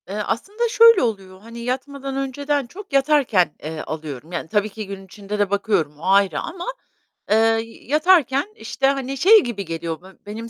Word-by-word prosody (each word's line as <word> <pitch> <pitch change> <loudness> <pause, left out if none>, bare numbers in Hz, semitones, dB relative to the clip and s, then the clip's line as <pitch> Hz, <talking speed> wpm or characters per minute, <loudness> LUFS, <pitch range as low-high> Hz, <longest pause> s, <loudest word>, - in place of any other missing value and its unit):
Eee, 195 - -6
aslında 420 - -2
şöyle 460 -2 +7
oluyor: 195 -5 -3
Hani 230 +2 -10
yatmadan 265 +3 -4
önceden 280 0 -2
çok 380 - -12
yatarken, 270 - +3
eee, 155 +1 -5
alıyorum. 155 -1 -7
Yani 170 -2 -4
tabii 210 0 +1
ki 215 0 -7
gün 195 -1 -8
içinde 205 +2 -7
de 205 -2 +2
bakıyorum 195 -8 0
o - - -14
ayrı 195 -3 +3
ama, 350 0 -6 0.7
eee, - - +6
y 225 0 0
yatarken, 305 - +2
işte, 270 -10 -1
hani, 275 -1 -1
şey 415 +7 +6
gibi 210 -5 -4
geliyor: 165 0 -5
Be 185 - -15 0.2
benim 225 +3 -7
225 Hz, 175 wpm, -21 LUFS, 195-275 Hz, 0.7 s, şöyle